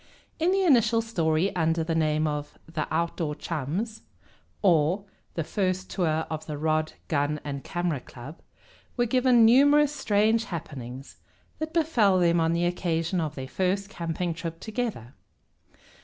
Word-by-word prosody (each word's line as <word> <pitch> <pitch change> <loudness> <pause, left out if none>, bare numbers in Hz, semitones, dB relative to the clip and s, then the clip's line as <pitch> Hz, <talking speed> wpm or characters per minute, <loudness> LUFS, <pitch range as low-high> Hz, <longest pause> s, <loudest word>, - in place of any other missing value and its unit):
In 330 +2 +2
the 390 0 +2
initial 235 - +4
story, 170 -3 0
under 165 -1 +1
the 165 +1 -2
name 155 -1 +1
of 150 -1 -3
"The 160 -2 -3
Outdoor 165 -1 -1
Chums; 175 - -4 0.6
or, 175 +1 +3 0.3
The 165 - -1
First 185 +2 -2
Tour 160 -4 0
of 155 0 -6
the 150 -2 -4
Rod, 155 +1 0
Gun, 150 0 0
and 140 -2 -5
Camera 175 -5 -2
Club," 130 +5 -11 0.6
were 240 - +3
given 245 -1 +4
numerous 285 +5 +5
strange 220 -2 +2
happenings 135 -6 -7 0.4
that 315 0 -3
befell 260 - +3
them 170 -1 +3
on 165 0 +2
the 170 +1 +1
occasion 175 0 -1
of 155 -2 -3
their 130 -1 -6
first 190 +6 -1
camping 170 0 -3
trip 165 0 -6
together. 220 - -4
170 Hz, 145 wpm, -26 LUFS, 155-215 Hz, 0.6 s, numerous